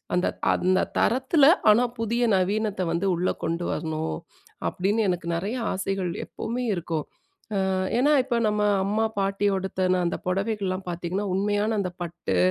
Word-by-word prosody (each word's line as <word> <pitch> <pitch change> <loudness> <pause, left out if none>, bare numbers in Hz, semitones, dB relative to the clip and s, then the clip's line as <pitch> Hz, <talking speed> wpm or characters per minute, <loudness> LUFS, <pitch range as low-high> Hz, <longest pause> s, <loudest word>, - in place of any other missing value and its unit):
"அந்த 180 - +2 0.3
அந்த 185 +1 +2 0.2
தரத்தில 265 +5 +3 0.3
ஆனா, 235 +4 +4 0.2
புதிய 235 +2 0
நவீனத்தை 200 0 0
வந்து 185 +4 0
உள்ள 180 +2 0 0.2
கொண்டு 170 +1 -1
வரணும்." 155 - -2 0.5
அப்படின்னு, 205 +5 0
எனக்கு 175 -1 -2
நெறைய 200 +8 -2 0.2
ஆசைகள் 190 -2 -2
எப்பவுமே 245 +2 -4
இருக்கும். 165 -3 -3 0.7
அ - - +1 0.3
ஏன்னா, 290 +4 +4
இப்ப 245 -3 -1
நம்ம 210 0 0 0.2
அம்மா, 215 +3 +1
பாட்டி 195 +1 0
உடுத்தன 185 -1 0
அந்த - - -2
புடவைகள்லாம் 195 -1 -1
பார்த்தீங்கன்னா, 175 +4 -3
உண்மையான 205 +2 +1
அந்த 180 -2 -3
பட்டு, 170 - -3
195 Hz, 140 wpm, -25 LUFS, 180-215 Hz, 0.7 s, ஆனா